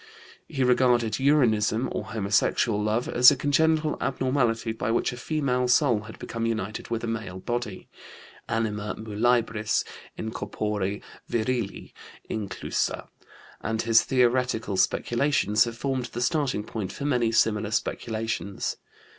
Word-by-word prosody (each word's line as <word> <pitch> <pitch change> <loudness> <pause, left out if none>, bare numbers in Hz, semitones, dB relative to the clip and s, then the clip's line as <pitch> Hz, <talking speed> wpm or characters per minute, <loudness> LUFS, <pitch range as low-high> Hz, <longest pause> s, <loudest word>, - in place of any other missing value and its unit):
He 135 -4 -1
regarded 125 -2 +3
uranism, 120 -5 +3
or - - -3
homosexual 105 0 +1
love, 110 +3 0
as 125 +1 +8
a 145 - +2
congenital 155 +3 +2
abnormality 125 -4 0
by 110 0 -3
which 115 +2 +1
a - - -5
female 125 -2 0
soul 125 -2 +4
had 110 - -10
become 115 -1 -3
united 110 -2 -3
with 115 -1 -2
a - - -2
male 110 -5 -4
body 120 0 -4 0.6
anima 105 -2 -1
muliebris 110 0 +1 0.3
in 110 - -4
corpore 105 -2 -3 0.3
virili 120 -2 -2 0.3
inclusa 100 -4 -3 0.5
and 110 0 -1
his 115 0 +5
theoretical 125 -4 +1
speculations 120 0 +2
have 115 -1 -6
formed 130 -1 -2
the 120 - -5
starting 130 -5 0
point 105 -3 -5
for 140 - -6
many 125 -5 +2
similar 110 -2 +2
speculations. 110 -2 -2
115 Hz, 130 wpm, -26 LUFS, 110-125 Hz, 0.6 s, as